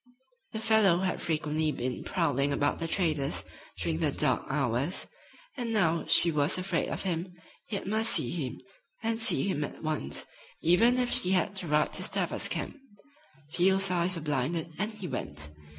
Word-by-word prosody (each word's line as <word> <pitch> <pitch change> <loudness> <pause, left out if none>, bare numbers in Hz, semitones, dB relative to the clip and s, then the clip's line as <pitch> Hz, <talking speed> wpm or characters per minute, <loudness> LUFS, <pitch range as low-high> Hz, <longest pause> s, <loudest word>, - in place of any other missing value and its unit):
The 220 - -3
fellow 215 -5 +3
had 190 -1 -2
frequently 155 -1 0
been 125 -2 -4
prowling 145 -6 0
about 145 +1 0
the 165 - -2
trader's 155 -5 0 0.4
during - - -1
the - - +1
dark - - +1
hours, - - -1 0.5
and 240 -3 -3
now 170 -7 +1
she 170 - +8
was 150 +1 +1
afraid 185 -2 -1
of - - -4
him, 180 -1 -3 0.3
yet 200 - -3
must 220 +3 +2
see - - +1
him, 145 -8 -4 0.5
and 225 0 -1
see 225 - +4
him 185 -7 -1
at 145 - -8
once, 155 -1 -2 0.4
even 225 +9 +5
if 250 -1 +1
she 185 +1 +4
had 185 +1 +1
to 185 -3 -4
ride 150 0 +1
to - - 0
Stabber's - - 0
camp. - - -4 0.7
Field's 190 +2 +2
eyes 180 +1 +1
were 165 - -6
blinded 155 +3 -1
and 210 +2 0
he 215 -4 -8
went. 75 - -5
175 Hz, 170 wpm, -29 LUFS, 150-195 Hz, 0.7 s, she